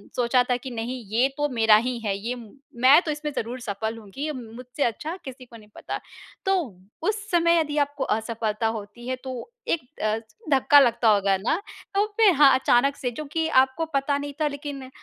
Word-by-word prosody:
सोचा 245 +1 +3
था 250 - +3
कि, 260 +2 -8
"नहीं, 240 +1 -4
ये 240 +4 +3
तो 295 0 +1
मेरा 225 -3 +5
ही 240 +3 +1
है। 195 - 0
ये 235 +5 -4 0.5
मैं 270 +6 +8
तो 315 - -3
इसमें 300 0 -4
ज़रूर 240 +3 -3
सफल 220 +1 -4
हूँगी। 225 +7 -7
मुझसे 250 +3 -5
अच्छा 300 +8 -2
किसी 260 -1 -9
को 235 -1 -16
नहीं 210 -1 -17
पता।" - - -5 0.5
तो 385 0 +3 0.5
उस 425 0 -2
समय 335 -1 +4
यदि 300 -2 -2
आपको 285 -1 0
असफलता 220 0 -1
होती 210 +4 -10
है, 255 - -1
तो 255 - -8 0.2
एक 280 -7 -1
अ, 215 +1 +1 0.3
धक्का 285 +1 +6
लगता 235 -3 +3
होगा 200 -2 +3
ना। 315 - -1 0.3
तो 405 +1 +3
फिर 430 -4 +6
हाँ, 280 -1 +7
अचानक 270 +2 +3
से, 250 -4 -3
चूँकि 305 +5 -3 0.2
आपको 265 +5 -3
पता 280 +1 +1
नहीं 285 0 -5
था, 300 - +3
लेकिन 285 -2 -6
255 Hz, 190 wpm, -25 LUFS, 230-290 Hz, 0.5 s, मैं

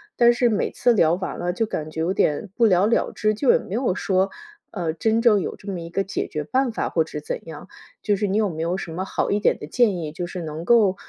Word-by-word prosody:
但 240 0 +5
是 240 0 +2
每 215 - 0
次 245 - +2
聊 165 -7 +4
完 190 +1 -5
了 175 0 -1
就 225 +5 0
感 155 -7 -4
觉 160 - -7
有 175 +3 0
点 180 0 0
不 235 - +4
了 190 -2 +4
了 230 - +1
之， 215 0 0
就 260 +3 +3
也 - - +5
没 195 - -8
有 240 -5 +1
说， 190 -1 +1 0.4
呃， 175 -5 -2
真 220 +7 +1
正 220 -4 +4
有 - - -4
这 200 - -8
么 185 - -4
一 165 0 -7
个 195 +3 -1
解 195 - -3
决 150 -1 -4
办 255 - 0
法 225 - -2
或 165 - +2
者 155 -1 -7
怎 150 - -5
样。 160 +2 -9 0.4
就 205 - +2
是 205 +1 -1
你 200 +2 0
有 210 -3 +2
没 160 -1 -5
有 175 +3 -1
什 175 - -6
么 180 +3 -3
好 - - -1
一 205 - +2
点 - - +2
的 150 - -7
建 210 +2 +2
议， 155 -3 -4
就 175 +3 -4
是 180 0 -6
能 155 0 -6
够 215 -4 +4
190 Hz, 300 characters per minute, -23 LUFS, 165-220 Hz, 0.4 s, 但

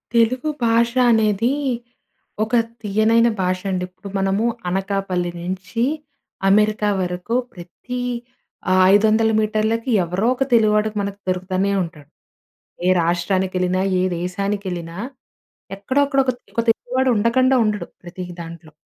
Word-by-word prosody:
తెలుగు 250 +6 +2 0.2
భాష 230 +1 +3 0.2
అనేది 220 +1 +2 0.9
ఒక 220 +3 -1 0.3
తియ్యనైన 220 +3 +3
భాష 185 0 0
అండి. 180 -1 -1
ఇప్పుడు 185 +2 -12
మనము 195 +3 +1 0.2
అనకాపల్లి 190 -2 -1
నుంచి 190 +6 -3 0.7
అమెరికా 210 +1 +3
వరకు 180 +5 -3 0.2
ప్రతి 185 +8 -7 0.9
500 220 +2 +4
మీటర్లకి 220 +3 0 0.2
ఎవరో 185 +7 -1
ఒక 270 - +1
తెలుగువాడికి 215 -1 +3
మనకు 200 0 -5
దొరుకుతూనే 185 +2 0
ఉంటాడు. 150 -4 -10 0.8
ఏ - - +4
రాష్ట్రానికెళ్ళినా 185 +1 0 0.2
ఏ - - +1
దేశానికెళ్ళినా 180 -1 -3 0.8
ఎక్కడో 260 +8 0
అక్కడ 275 -1 +1
ఒక 255 - +2 0.2
ఒక 230 - +2
తెలుగువాడు 255 +3 -1
ఉండకుండా 255 +5 +3
ఉండడు 210 -1 -2 0.2
ప్రతి 180 +1 -7 0.2
దాంట్లో. 165 -1 -10
200 Hz, 110 wpm, -21 LUFS, 185-225 Hz, 0.9 s, 500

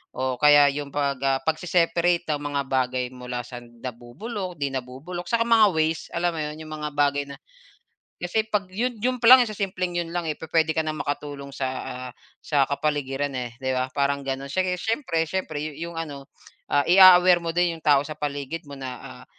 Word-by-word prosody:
o 130 0 -1
kaya 145 -1 +7
yung 145 -1 -4
pag, 140 -2 -1
ah, 135 -1 +2
pagse-separate 170 +2 +1
ng 145 - -7
mga 145 -1 -1
bagay 130 -1 0
mula 125 -1 -6
sa 125 - -8
nabubulok, 130 - -7
di 140 - 0
nabubulok, 135 +8 -6
saka 230 0 +1
mga 225 -2 +6
ways, 160 0 0
alam 170 0 -1
mo - - -4
yun, 150 +1 -5
yung - - -11
mga 150 - -2
bagay 145 0 +2
na 140 - -9 0.8
kasi 215 +5 -1
'pag 200 -4 -2
yun 240 +5 -1
yun 255 0 0
pa 235 - +2
lang 255 0 +10
sa 215 - -5
simpleng 185 -3 -2
yun 170 - -3
lang, 175 - 0
eh, 155 -2 -4
pupwede 160 0 +1
ka 160 - -1
na 155 - -2
makatulong 145 -1 -5
sa, 135 -1 -3 0.2
ah, 125 0 -6 0.3
sa 145 -3 +2
kapaligiran, 140 -1 -2
eh, 125 -2 -4
di 130 -1 -1
ba, 130 +1 -1
parang 140 0 0
ganon 135 0 -4
siyege 180 +4 -1
siyempre 220 - -1
siyempre 155 -4 -3
yu 150 -1 -5
yung 170 +1 -6
ano, 145 -4 -6 0.5
ah, 145 0 +2
i-a-aware 180 -1 +7
mo 165 - -1
din 175 0 +1
yung 160 - -15
tao 145 -1 +4
sa 155 - -6
paligid 145 +2 -4
mo 145 -2 -11
na, 130 - -5 0.3
ah, - - -13
150 Hz, 200 wpm, -24 LUFS, 140-175 Hz, 0.8 s, lang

